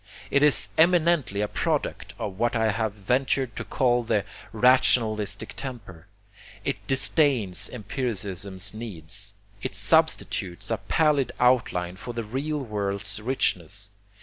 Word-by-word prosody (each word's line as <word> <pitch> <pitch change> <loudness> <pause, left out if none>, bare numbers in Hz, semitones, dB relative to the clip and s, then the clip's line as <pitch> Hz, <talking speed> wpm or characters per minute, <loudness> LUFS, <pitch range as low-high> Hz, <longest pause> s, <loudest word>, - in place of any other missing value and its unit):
It 140 - +4
is 150 -1 +4
eminently 165 - +3
a 105 - +1
product - - -2
of 100 -1 -5
what 120 +1 +1
I 110 -1 +2
have 110 0 -1
ventured 125 +4 0
to - - -4
call 125 -2 +2
the 105 -3 0 0.3
rationalistic 110 -3 +2
temper. 100 - -8 0.6
It - - 0
disdains 130 - +2
empiricism's 100 -5 -3
needs. 100 -2 -5 0.3
It 100 - -3
substitutes 100 - +1
a - - +1
pallid 150 -4 +1
outline 105 -8 +2
for 120 +4 -7
the 115 - -2
real 135 +8 -3
world's 100 -3 -3
richness. 100 -5 -1
110 Hz, 120 wpm, -26 LUFS, 100-130 Hz, 0.6 s, It